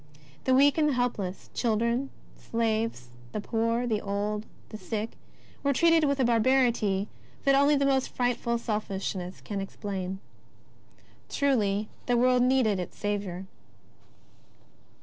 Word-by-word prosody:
The 260 - +4
weak 285 +3 +5
and 300 -1 +4
the - - +1
help 245 -2 0
less 185 -1 -5
— - - -31
children, 235 +3 0 0.3
slaves, 225 - -2 0.2
the - - -2
poor, 230 +3 0
the 220 -3 0
old, 205 +2 -2 0.2
the 215 - -7
sick, 220 0 -3 0.5
were 280 0 +2
treated 330 +2 +4
with 280 -1 +1
a - - +4
barbarity 235 -4 +2 0.4
that 275 - +4
only 280 +2 +5
the 280 0 +2
most 270 -1 +2
frightful 245 -1 0
selfishness 195 -4 -3
can 200 -2 -4
explain. 195 -1 -4 1.1
Truly 215 -7 +1 0.2
the 245 -1 +3
world 250 +1 +4
needed 250 -6 +3
its 180 - -6
Saviour 200 -3 -3
230 Hz, 135 wpm, -28 LUFS, 205-260 Hz, 1.1 s, weak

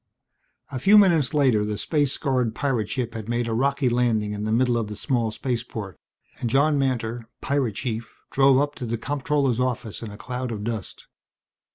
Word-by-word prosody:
A 130 - -3
few 200 +10 +6
minutes 170 - +5
later 130 -8 +3
the 105 0 -2
space 145 +2 +1
scarred 125 -7 0
pirate 125 -7 -1
ship 120 -3 -2
had 110 -1 -6
made 120 0 0
a 115 - -1
rocky 140 +3 +1
landing 115 -4 +1
in 105 0 -4
the 110 - -1
middle 120 +1 +3
of 115 -2 -1
the 105 - -6
small 115 +1 0
spaceport 115 -4 -4 0.4
and 120 - -1
John 145 +3 +3
Mantor, 120 -3 -2
pirate 135 -7 0
chief, 115 -1 -4
drove 135 -1 +5
up 145 +1 0
to 125 - -5
the 115 +1 -1
comptroller's 140 -1 0
office 125 -4 -2
in 115 - -6
a 105 - -10
cloud 125 +2 -4
of 105 -2 -4
dust. 110 -4 -5
120 Hz, 190 wpm, -24 LUFS, 110-135 Hz, 0.4 s, few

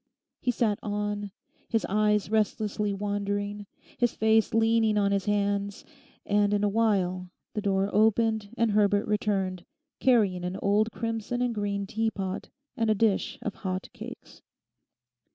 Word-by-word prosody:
He 255 - -1
sat 220 -4 +1
on, 205 -1 -2 0.4
his 225 - +1
eyes 210 0 +1
restlessly 210 -1 0
wandering, 205 0 -2 0.3
his 240 -1 +2
face 220 0 +3
leaning 225 -1 +3
on 200 -1 +2
his 200 -1 0
hands; 200 -1 -1 0.4
and 205 0 +2
in 205 - 0
a - - +4
while 190 -4 +1 0.2
the 210 - -2
door 195 -1 +1
opened 220 0 +2
and 230 -1 +2
Herbert 205 0 +3
returned, 195 -4 -1 0.4
carrying 205 -8 +3
an 180 +1 -3
old 210 +3 +2
crimson 230 +1 -3
and 245 -1 0
green 200 -2 -2
teapot 200 -2 -3 0.3
and 225 -4 0
a 215 - +4
dish 210 -1 +1
of 210 - -2
hot 185 -1 -4
cakes. - - -10
205 Hz, 140 wpm, -28 LUFS, 200-220 Hz, 0.4 s, a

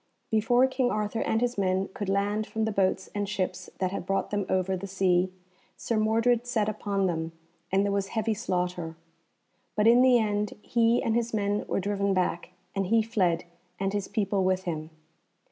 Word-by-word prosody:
Before 230 +4 +4
King 260 -1 +1
Arthur 215 0 -1
and 220 - +1
his 245 -3 0
men 190 0 +1
could 205 -2 -4
land 205 +2 0
from 220 0 -1
the 220 - -1
boats 190 -1 0
and 205 -1 -2
ships 185 -2 -3
that 185 -1 -1
had 200 - -3
brought 195 - 0
them 205 -2 -1
over 190 0 +1
the 190 +2 -5
sea 185 -1 +2 0.5
Sir 230 - -2
Mordred 230 +2 +2
set 220 -4 +1
upon 200 -2 -1
them, 165 -2 -2 0.4
and 195 +1 +3
there 200 - 0
was 200 -1 0
heavy 220 +1 -1
slaughter. 180 -6 -2 0.8
But 210 - +2
in 235 +2 +7
the 255 -1 +6
end 210 -2 0
he 235 0 +2
and 225 - +1
his 235 0 0
men 205 0 0
were - - 0
driven 200 0 0
back, 180 -1 0 0.2
and 195 -2 -1
he 225 +2 +4
fled, 185 -7 +1 0.4
and 195 +1 -1
his 205 -2 -2
people 200 -3 0
with 185 0 +1
him. 155 -4 -4
205 Hz, 190 wpm, -28 LUFS, 190-220 Hz, 0.8 s, in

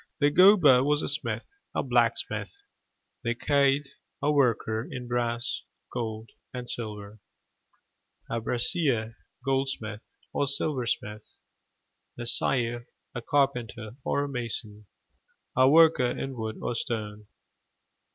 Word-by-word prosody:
The 145 0 +4
gobha 170 -7 +7
was 145 +1 +2
a - - -1
smith 145 +3 -1 0.3
a - - +1
blacksmith; 400 0 0 0.6
the 120 0 0
caird, 140 +1 +2 0.3
a 150 - +1
worker 115 -5 +1
in 125 -1 -6
brass, 120 -1 -1 0.3
gold, 110 -2 -4 0.2
and 125 -1 -6
silver 105 -3 -6 1.1
a 115 0 -2
brasier, 120 -1 0 0.3
goldsmith, 135 -5 -2 0.3
or 145 - +1
silversmith; 125 -7 -2 0.8
the 120 - -5
saer, 120 0 +1 0.3
a 120 - -4
carpenter 120 -5 0
or 140 - 0
a - - -3
mason 115 -5 -5 0.7
a 130 +1 +6
worker 160 -5 +6
in 135 +2 -4
wood 110 -2 -4
or - - -1
stone. 105 -4 -4
120 Hz, 110 wpm, -27 LUFS, 115-140 Hz, 1.1 s, gobha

